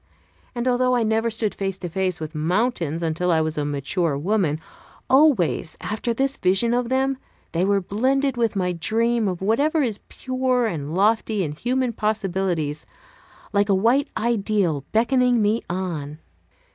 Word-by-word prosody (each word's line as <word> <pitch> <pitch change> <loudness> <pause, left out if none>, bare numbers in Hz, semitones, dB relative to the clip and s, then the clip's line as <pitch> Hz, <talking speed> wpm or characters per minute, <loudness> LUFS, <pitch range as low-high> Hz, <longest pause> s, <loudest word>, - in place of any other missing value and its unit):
And 240 +1 -2
although 250 0 +2
I 240 - +2
never 220 +1 +1
stood 220 -2 -1
face 195 -1 -3
to 185 - -5
face 185 0 -1
with 155 0 -6
mountains 170 - -1
until 165 +2 0
I 160 - +3
was 160 0 -1
a 150 - -1
mature 145 +2 -1
woman, 170 -2 0 0.5
always, 260 - +3
after 215 +3 -3
this 270 +4 0
vision 195 +6 +2
of 245 -1 0
them, 265 0 0 0.3
they 170 +2 0
were 200 +1 +2
blended 265 +8 0
with 230 -3 0
my 180 -2 0
dream 225 +6 0
of 185 -1 -3
whatever 285 +9 +2
is 220 -5 -2
pure 255 -1 0
and 160 -6 -3
lofty 215 +1 +2
in 150 - -3
human 245 - -1
possibilities, 190 -8 -2 0.7
like 205 0 +2
a 195 - +4
white 235 +8 +2
ideal 200 - 0
beckoning 245 +1 +3
me 215 +2 +2
on. 165 -5 -4
205 Hz, 160 wpm, -23 LUFS, 175-240 Hz, 0.7 s, a